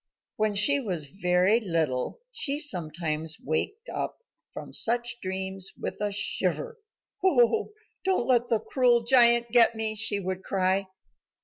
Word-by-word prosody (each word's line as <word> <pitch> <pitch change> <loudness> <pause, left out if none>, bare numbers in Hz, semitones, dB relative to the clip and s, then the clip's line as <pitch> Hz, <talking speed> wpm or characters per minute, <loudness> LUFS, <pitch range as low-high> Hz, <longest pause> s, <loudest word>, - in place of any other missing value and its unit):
When 215 -1 0
she 280 +8 +5
was 175 - -4
very 180 +4 +2
little 165 - -2
she 285 - +1
sometimes 160 - 0
waked 410 - -3
up - - -4 0.3
from - - -9
such 240 0 0
dreams 190 0 -3
with - - -6
a 205 0 -1
shiver. 470 - -1 0.4
"O, 375 - +2 0.3
don't 375 -10 0
let 245 -1 +2
the 225 - +2
cruel 245 -3 +2
giant 235 -1 +4
get 235 -1 +4
me," 220 -1 -1
she 210 -1 -1
would 190 0 -5
cry. 190 0 0
215 Hz, 135 wpm, -26 LUFS, 185-240 Hz, 0.4 s, she